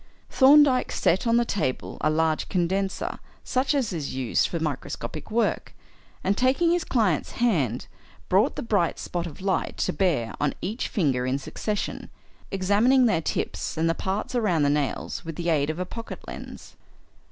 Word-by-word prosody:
Thorndyke 275 Hz, -1 st, +6 dB
set 190 Hz, +7 st, +1 dB
on 230 Hz, 0 st, +4 dB
the 240 Hz, -, +3 dB
table 195 Hz, -, -2 dB
a 155 Hz, -, +2 dB
large 160 Hz, 0 st, +1 dB
condenser 190 Hz, +2 st, -1 dB, 0.2 s
such 260 Hz, +3 st, 0 dB
as 250 Hz, -8 st, 0 dB
is 150 Hz, -6 st, -4 dB
used 130 Hz, -3 st, +1 dB
for 170 Hz, -, -3 dB
microscopic 155 Hz, 0 st, -4 dB
work, 230 Hz, +2 st, 0 dB, 0.5 s
and 195 Hz, -, +2 dB
taking 265 Hz, +8 st, +3 dB
his 350 Hz, -1 st, +1 dB
client's 215 Hz, -, 0 dB
hand, 150 Hz, -, +1 dB, 0.4 s
brought 205 Hz, +9 st, +3 dB
the -, -, -4 dB
bright 200 Hz, -7 st, +1 dB
spot 175 Hz, -1 st, -3 dB
of 170 Hz, -, -10 dB
light 190 Hz, -1 st, -1 dB
to -, -, 0 dB
bear 150 Hz, -, 0 dB
on 145 Hz, -1 st, +1 dB
each 215 Hz, +7 st, -3 dB
finger 135 Hz, -, 0 dB
in 130 Hz, +1 st, +1 dB
succession, 205 Hz, +9 st, -4 dB, 0.4 s
examining 210 Hz, +7 st, +3 dB
their 195 Hz, -8 st, +2 dB
tips 160 Hz, -, -3 dB
and 160 Hz, +1 st, +2 dB
the 165 Hz, -, +2 dB
parts 190 Hz, +7 st, -3 dB
around 200 Hz, -11 st, +2 dB
the 145 Hz, -, +3 dB
nails 145 Hz, +2 st, -2 dB
with 165 Hz, -2 st, -6 dB
the 170 Hz, +1 st, -2 dB
aid 150 Hz, -2 st, +2 dB
of 155 Hz, -, -2 dB
a 180 Hz, -, -2 dB
pocket 230 Hz, +5 st, -7 dB
lens. -, -, -9 dB
185 Hz, 170 wpm, -25 LUFS, 155-230 Hz, 0.5 s, Thorndyke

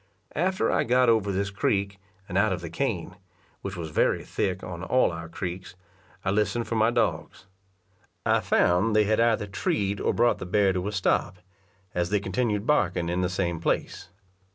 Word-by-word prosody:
After 185 Hz, +4 st, +1 dB
I -, -, +2 dB
got 125 Hz, +1 st, +3 dB
over 110 Hz, -3 st, +2 dB
this 100 Hz, +1 st, -1 dB
creek 100 Hz, 0 st, -1 dB, 0.3 s
and 90 Hz, -, -6 dB
out 100 Hz, +2 st, +3 dB
of 90 Hz, -1 st, -2 dB
the 85 Hz, -2 st, -7 dB
cane, 95 Hz, -6 st, -3 dB, 0.4 s
which 100 Hz, -1 st, -5 dB
was 80 Hz, -3 st, -5 dB
very -, -, +1 dB
thick 95 Hz, -2 st, -2 dB
on 90 Hz, -1 st, -6 dB
all 125 Hz, +1 st, +2 dB
our 85 Hz, 0 st, -7 dB
creeks, 90 Hz, +2 st, -6 dB, 0.5 s
I 95 Hz, -, +2 dB
listened 105 Hz, +3 st, 0 dB
for -, -, -3 dB
my 110 Hz, 0 st, +3 dB
dogs. 90 Hz, -9 st, -1 dB, 0.8 s
I -, -, +3 dB
found 95 Hz, +5 st, +2 dB
they 105 Hz, -, +5 dB
had 110 Hz, +2 st, +1 dB
either 115 Hz, -3 st, +2 dB
treed 100 Hz, 0 st, -1 dB
or -, -, +2 dB
brought 120 Hz, +1 st, +2 dB
the 95 Hz, -, -6 dB
bear 100 Hz, 0 st, +3 dB
to 90 Hz, +1 st, -2 dB
a -, -, -2 dB
stop, 95 Hz, -2 st, 0 dB, 0.6 s
as 90 Hz, -1 st, -1 dB
they 105 Hz, +1 st, +2 dB
continued 105 Hz, +1 st, -1 dB
barking 90 Hz, -12 st, +1 dB
in 90 Hz, +1 st, 0 dB
the 90 Hz, -, 0 dB
same 90 Hz, -3 st, -1 dB
place. 85 Hz, -, -2 dB
100 Hz, 185 wpm, -26 LUFS, 90-110 Hz, 0.8 s, they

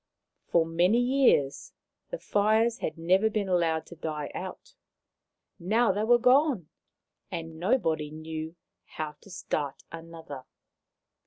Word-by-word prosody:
For 165 Hz, -1 st, +3 dB
many 175 Hz, +6 st, +2 dB
years 245 Hz, -, +2 dB, 0.4 s
the -, -, -4 dB
fires 220 Hz, -, +2 dB
had -, -, -4 dB
never 185 Hz, +6 st, +3 dB
been 210 Hz, -2 st, -1 dB
allowed 170 Hz, -3 st, +1 dB
to 170 Hz, -, -12 dB
die 155 Hz, -3 st, -4 dB
out. -, -, -7 dB, 0.9 s
Now 220 Hz, +6 st, +2 dB
they 205 Hz, +3 st, -1 dB
were 240 Hz, +2 st, +5 dB
gone, 250 Hz, -, +3 dB, 0.6 s
and 165 Hz, -1 st, -6 dB
nobody 165 Hz, -, +1 dB
knew 160 Hz, +1 st, -6 dB, 0.3 s
how 155 Hz, -1 st, -5 dB
to -, -, -16 dB
start 150 Hz, -6 st, -4 dB
another. 165 Hz, -5 st, -9 dB
170 Hz, 120 wpm, -28 LUFS, 160-220 Hz, 0.9 s, were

